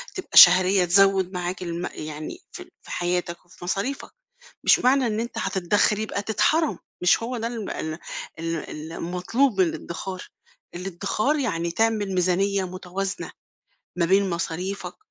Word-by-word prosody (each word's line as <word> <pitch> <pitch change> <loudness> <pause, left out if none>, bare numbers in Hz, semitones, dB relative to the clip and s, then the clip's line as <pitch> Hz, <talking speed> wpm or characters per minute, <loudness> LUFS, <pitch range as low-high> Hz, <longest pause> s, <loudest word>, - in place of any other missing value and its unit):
تبقى 375 - -3
شهرية 185 +1 +8
تزوّد 195 +1 +4
معاك 180 0 -3
الـم 170 0 -4
يعني 155 0 -7
في - - -10
في - - -12
حياتك 175 0 -2
وفي 175 0 -16
مصاريفك. 200 +10 -3 0.5
مش - - +6
معنى 255 0 +3
إن 215 -1 -1
أنت 235 +1 -5
هتتدخِر 205 +3 +1
يبقى 215 -2 -2
تتحرَم، 305 +9 +1 0.2
مش 180 +5 +3
هو 245 +1 -3
ده 230 - -2
الم 230 -4 -5
ال 155 +1 -4 0.4
ال 160 -1 -5
المطلوب 190 +7 0
من 180 - +4
الإدّخار. 185 +3 -6 0.5
الإدّخار 195 - -1
يعني 170 -10 -1
تعمل 210 -1 0
ميزانية 190 +2 +1
متوازنة 185 +2 -5 0.6
ما 175 -1 +1
بين 195 +2 +3
مصاريفك، 180 +3 -4
185 Hz, 140 wpm, -24 LUFS, 175-210 Hz, 0.6 s, شهرية